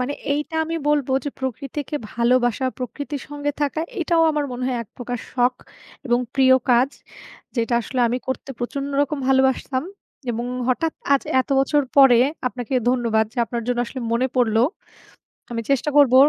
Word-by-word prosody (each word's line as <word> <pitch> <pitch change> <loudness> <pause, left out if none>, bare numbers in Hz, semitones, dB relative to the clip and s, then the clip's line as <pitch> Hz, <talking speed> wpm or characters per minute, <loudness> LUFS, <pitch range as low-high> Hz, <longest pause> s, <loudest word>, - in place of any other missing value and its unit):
মানে 250 +3 -1 0.2
এইটা 295 +2 -3
আমি 330 +1 -4
বলব 295 -3 +2 0.2
যে, 285 - -2
প্রকৃতিকে 275 +3 -4 0.2
ভালোবাসা, 245 +1 +2
প্রকৃতির 280 +3 -5
সঙ্গে 290 0 -2
থাকা 290 +2 0 0.2
এটাও 335 0 +3
আমার 300 -1 0
মনে 250 +1 -5
হয় 255 -1 -1
একপ্রকার 245 +2 -6
শখ 250 0 +2 0.5
এবং 240 -1 +3 0.2
প্রিয় 260 -1 +6 0.2
কাজ। 245 +2 +5 0.7
যেটা 235 0 +1
আসলে 255 +2 -3
আমি 245 +2 0
করতে 260 +1 -4
প্রচণ্ড 275 +3 -3
রকম 290 +1 -2
ভালোবাসতাম 265 0 +2 0.5
এবং 235 +1 -3 0.2
হঠাৎ 315 +6 +1 0.2
আজ 275 - +4 0.2
এত - - -5
বছর 290 +2 +2 0.2
পরে 270 -4 +8 0.3
আপনাকে 250 +1 -5
ধন্যবাদ 235 -3 +2
যে, - - -24
আপনার 235 +1 -4
জন্য 245 -1 0
আসলে 260 - -6
মনে 240 +2 +2
পড়লো। 225 -2 +3 0.9
আমি 235 -1 -2
চেষ্টা 275 +2 +2
করব 280 -4 +6
260 Hz, 160 wpm, -22 LUFS, 245-285 Hz, 0.9 s, পরে